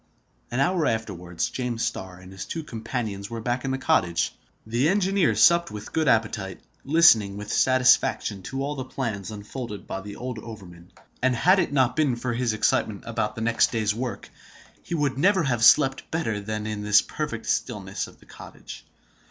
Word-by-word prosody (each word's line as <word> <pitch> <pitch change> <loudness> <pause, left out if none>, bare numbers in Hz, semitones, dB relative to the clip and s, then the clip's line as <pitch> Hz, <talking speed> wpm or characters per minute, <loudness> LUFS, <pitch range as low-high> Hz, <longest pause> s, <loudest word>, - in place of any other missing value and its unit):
An 120 - -2
hour 165 +3 +2
afterwards, 90 -6 -3
James 120 -3 -2
Starr 95 -1 -5
and 90 0 -13
his 95 0 -7
two 165 - -5
companions 110 -5 -5
were 115 - -5
back 120 +2 -2
in 135 - -2
the 135 - -1
cottage. 95 - +1 0.3
The 120 +7 +1
engineer 195 -1 +2
supped 170 0 +5
with 105 -1 -9
good 160 -1 +1
appetite, 110 -5 0 0.2
listening 115 -10 +5
with 105 0 -5
satisfaction 130 -5 +3
to 135 0 -3
all 145 +1 -2
the 135 -3 -4
plans 115 -7 -4
unfolded 105 +1 -7
by 95 - -5
the 100 +1 -9
old 125 -2 -5
overman; 90 -6 -11 0.3
and 130 0 +2
had 185 +11 +4
it - - 0
not 130 -3 +2
been 150 -6 +2
for 120 +1 -3
his 120 -1 0
excitement 110 -1 0
about 110 -2 -2
the 110 - -6
next 115 +1 +2
day's 110 -3 0
work, 115 -3 -5 0.5
he 170 - -4
would 140 -4 0
never 190 +1 +4
have 120 -5 0
slept 135 +3 +5
better 135 -11 -2
than 110 +1 -4
in 110 -1 -4
the 105 0 +4
perfect - - -4
stillness - - -2
of - - -17
the - - -20
cottage. - - -11
115 Hz, 185 wpm, -25 LUFS, 105-135 Hz, 0.5 s, supped